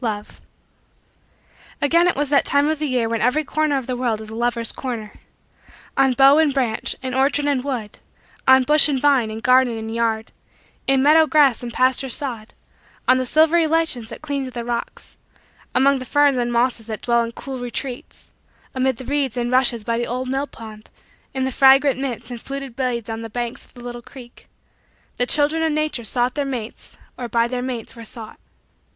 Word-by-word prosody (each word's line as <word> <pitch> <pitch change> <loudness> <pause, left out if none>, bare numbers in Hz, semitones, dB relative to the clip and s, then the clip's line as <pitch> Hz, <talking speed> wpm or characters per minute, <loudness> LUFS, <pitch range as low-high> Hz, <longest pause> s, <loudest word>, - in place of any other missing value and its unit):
LOVE 210 -2 -5 1.4
Again 335 +5 +3
it 355 - +1
was 290 0 -1
that 280 - +4
time 285 +1 +2
of 315 -1 -1
the 305 - -1
year 250 -4 0
when 230 -1 -2
every 255 +7 +2
corner 305 -1 0
of 265 - -4
the 255 - -3
world 240 -3 -1
is 220 0 -9
a - - -7
lovers' 235 -1 0
corner. 235 -5 -6 0.8
On 270 -1 +3
bough 275 +3 +6
and 315 -2 +3
branch, 250 -5 -1
in 260 -1 -3
orchard 275 +2 +1
and 280 -3 0
wood; 245 -7 -5 0.5
on 260 0 +7
bush 300 +3 +5
and 275 -2 0
vine, 270 -5 +3
in 220 +1 -6
garden 250 -1 +3
and 220 0 -5
yard; 225 -1 -1 0.6
in 270 -1 +3
meadow 315 +2 +6
grass 290 -6 +4
and 240 -1 -6
pasture 260 +2 +1
sod; 235 -4 -3 0.5
on 255 - +5
the 255 -1 -1
silvery 320 +3 +4
lichens 310 -8 0
that - - -10
cling 285 -2 -2
to 260 - -5
the 240 -1 -6
rocks; 240 -1 -5 0.6
among 275 +1 +4
the 255 - -7
ferns 290 -1 +3
and 240 0 -1
mosses 235 -1 0
that 220 -2 -5
dwell 235 -1 +2
in 230 0 -3
cool 265 +2 -7
retreats; 245 +1 -6 0.4
amid 260 -1 0
the 260 - -9
reeds 270 -2 -1
and 240 0 -1
rushes 250 -3 +2
by 230 +1 -1
the 240 - -2
old 255 +2 -3
mill 270 +2 -1
pond; 215 -3 -12 0.4
in 265 -1 -2
the 265 - -1
fragrant 270 0 +5
mints 245 -3 -5
and 240 -2 -7
fluted 275 -3 -7
blades 245 -4 -2
on 225 0 -5
the 225 - -7
banks 240 +1 -4
of - - -24
the 245 - -12
little 240 0 -7
creek; 240 -1 -14 0.7
the 245 - +1
children 300 +3 +2
of 320 -1 +1
Nature 305 -5 -1
sought 245 +3 0
their 290 - -1
mates 245 -5 -6 0.2
or 245 - -4
by 230 +1 +2
their 250 0 -3
mates 245 -3 -5
were 230 - -10
sought. 225 -1 -10
255 Hz, 200 wpm, -21 LUFS, 235-275 Hz, 1.4 s, on